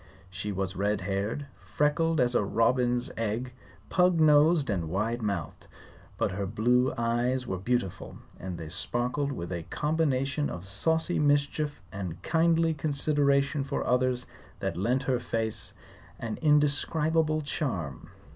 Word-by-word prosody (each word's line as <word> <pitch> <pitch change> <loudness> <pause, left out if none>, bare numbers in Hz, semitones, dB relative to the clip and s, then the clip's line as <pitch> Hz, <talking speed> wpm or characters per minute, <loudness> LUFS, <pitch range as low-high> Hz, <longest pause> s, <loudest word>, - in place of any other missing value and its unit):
She 105 +3 -4
was 95 -1 -3
red 100 +1 0
haired, 100 +8 -2
freckled 150 - +1
as 125 -1 +3
a 115 - +3
robin's 120 +3 +1
egg, 115 +3 -2 0.4
pug 180 -2 +3
nosed 155 0 +5
and 90 -7 -1
wide 110 +7 -1
mouthed. 100 -7 -4 0.5
But - - 0
her 100 +1 -3
blue 125 +5 +2
eyes 120 +2 0
were 95 - -3
beautiful, 100 -3 -2 0.2
and 90 -1 -5
they 80 -2 -7
sparkled 125 - -1
with 85 -9 -5
a 85 -1 -3
combination 150 -2 0
of 90 +1 -7
saucy 160 - +1
mischief 145 0 +1
and 95 -3 -5
kindly 165 0 +3
consideration 140 -1 +1
for 140 +1 -3
others 125 0 +1 0.3
that - - -2
lent 120 +9 0
her 130 -2 +1
face 110 -3 -2 0.4
an 115 -2 -5
indescribable 155 +1 +2
charm. 95 - -3
125 Hz, 135 wpm, -28 LUFS, 100-150 Hz, 0.5 s, nosed